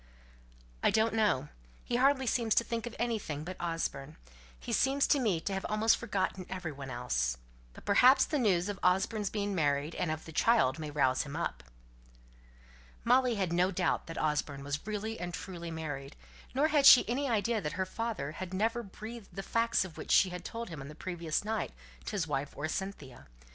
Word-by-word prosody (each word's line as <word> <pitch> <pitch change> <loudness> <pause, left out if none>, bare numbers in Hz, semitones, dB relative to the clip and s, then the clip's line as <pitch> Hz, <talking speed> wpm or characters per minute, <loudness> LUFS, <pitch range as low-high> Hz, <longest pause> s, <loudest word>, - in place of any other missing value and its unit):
"I - - +4
don't 220 +1 +2
know. 200 -11 +1 0.3
He 240 - -1
hardly 265 +1 +3
seems 230 -2 +1
to - - +4
think 230 0 -3
of 235 - -8
anything 210 -11 -2
but 185 +3 -6
Osborne. 160 -4 -3 0.4
He - - -6
appears 275 +1 +3
to 285 - +3
me 210 -10 +1
to 195 - -3
have 190 - -2
almost 215 +1 +4
forgotten 190 -4 -2
every 185 -4 -4
one 140 -1 -8
else. 65 - -1 0.4
But - - -14
perhaps 255 +6 +6
the 300 - -1
news 190 -6 +2
of 205 -1 -4
Osborne's 195 +3 +1
being 205 -1 -2
married, 145 -2 0
and 175 - -2
of 155 0 -3
the 160 - -9
child, 165 - +3
may 155 -1 -4
rouse 130 -3 +2
him 145 0 -6
up." 65 - -3 1.4
Molly 250 0 +4
had 190 -4 -1
no 180 +2 +3
doubt 195 - 0
that 165 - -7
Osborne 150 -2 -1
was 145 +6 -4
really 215 +1 -3
and 175 0 -4
truly 170 -3 -7
married, 145 -4 -5 0.4
nor 295 +4 +3
had 290 -3 +5
she 265 - +9
any 265 +4 -1
idea 225 0 +1
that 150 - -3
her 190 - -1
father 205 -8 -3
had 185 +3 -6
never 225 +4 +1
breathed 220 +1 -9
the 195 - -4
facts 230 -2 +1
of 175 - -10
which - - -8
she 185 - +5
had 180 -1 -6
told 230 +4 -6
him 160 -5 -7
on 135 - -8
the 150 - -10
previous 170 -1 -3
night, 220 - -2 0.3
to - - -5
his 195 -6 0
wife 145 -2 -3
or 150 - -2
Cynthia. 155 - -6
190 Hz, 200 wpm, -31 LUFS, 155-225 Hz, 1.4 s, she